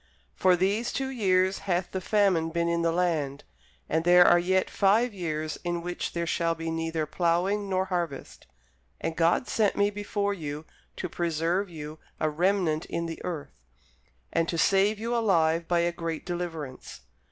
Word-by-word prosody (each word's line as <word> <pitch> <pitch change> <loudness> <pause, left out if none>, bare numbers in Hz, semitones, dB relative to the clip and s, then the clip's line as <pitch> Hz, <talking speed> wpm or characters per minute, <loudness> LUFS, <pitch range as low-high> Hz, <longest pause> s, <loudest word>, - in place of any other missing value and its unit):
For 185 -1 +4
these 200 +6 0
two 270 -1 -2
years 190 -6 +2
hath 175 0 0
the 190 - -3
famine 190 -5 +2
been 170 +1 -1
in 170 0 +1
the 165 0 +2
land; 160 -5 -1 0.4
and 160 - 0
there 175 +1 +7
are 175 - +6
yet 185 +2 +1
five 215 +4 +2
years 155 -4 -3
in 175 -1 -1
the - - -2
which 175 +1 -4
there 170 0 -1
shall 165 0 0
be 165 0 -4
neither 165 -1 -2
ploughing 180 +6 0
nor 190 0 +1
harvest. 175 -7 -4 0.5
And 165 0 -3
God 170 +8 +2
sent 215 -3 +1
me 205 0 +2
before 205 0 -2
you 150 -4 -6 0.3
to - - -4
preserve 170 +3 -1
you 155 -1 -8 0.2
a 155 - +1
remnant 175 -1 +1
in 170 0 -3
the 165 -1 -6
earth, 160 - -6 0.7
and 165 0 +1
to 170 - -1
save 195 +5 +3
you 230 +3 -2
alive 170 -7 +2
by 175 -1 +2
a 170 0 +1
great 165 -2 -5
deliverance. 165 -7 -6
175 Hz, 175 wpm, -27 LUFS, 165-190 Hz, 0.7 s, there